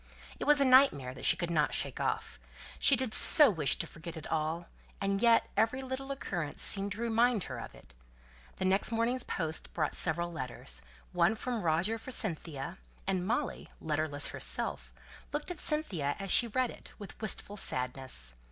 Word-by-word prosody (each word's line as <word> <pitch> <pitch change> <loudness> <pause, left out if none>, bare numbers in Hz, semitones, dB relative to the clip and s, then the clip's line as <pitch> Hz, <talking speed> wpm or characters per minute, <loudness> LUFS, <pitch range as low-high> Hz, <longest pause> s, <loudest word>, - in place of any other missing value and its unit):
It - - -3
was 295 0 +5
a 275 - +4
nightmare 255 - +5
that - - -6
she - - +5
could 175 -1 -2
not 150 -3 +1
shake - - -1
off; 60 - -2 0.4
she 275 - +6
did 250 -3 0
so 295 -7 +7
wish 155 -7 +1
to - - -3
forget 165 0 -9
it 155 - -8
all, 160 +2 -1 0.3
and 195 0 -1
yet 235 -1 +5
every 225 +5 +1
little 265 +1 -5
occurrence 175 - -3
seemed 200 0 +4
to 215 - -7
remind 230 -2 +2
her 130 -3 -6
of - - -9
it. - - -16 0.6
The 190 - -3
next 195 +4 +2
morning's 230 +3 0
post 160 -2 -3
brought 155 -3 0
several 170 +1 0
letters; 120 - -4 0.3
one 220 - +3
from 240 0 -3
Roger 175 +7 0
for 240 - -10
Cynthia, 160 - -4 0.3
and 185 -1 -1
Molly, 245 +5 -2
letterless 150 -2 -2
herself, - - -1 0.4
looked 295 +4 -3
at 345 - -6
Cynthia 185 - 0
as 195 -1 -4
she 240 - +6
read 255 +2 0
it, - - -13
with 205 0 -11
wistful 205 -1 -2
sadness. 125 - -2
195 Hz, 180 wpm, -31 LUFS, 155-240 Hz, 0.6 s, so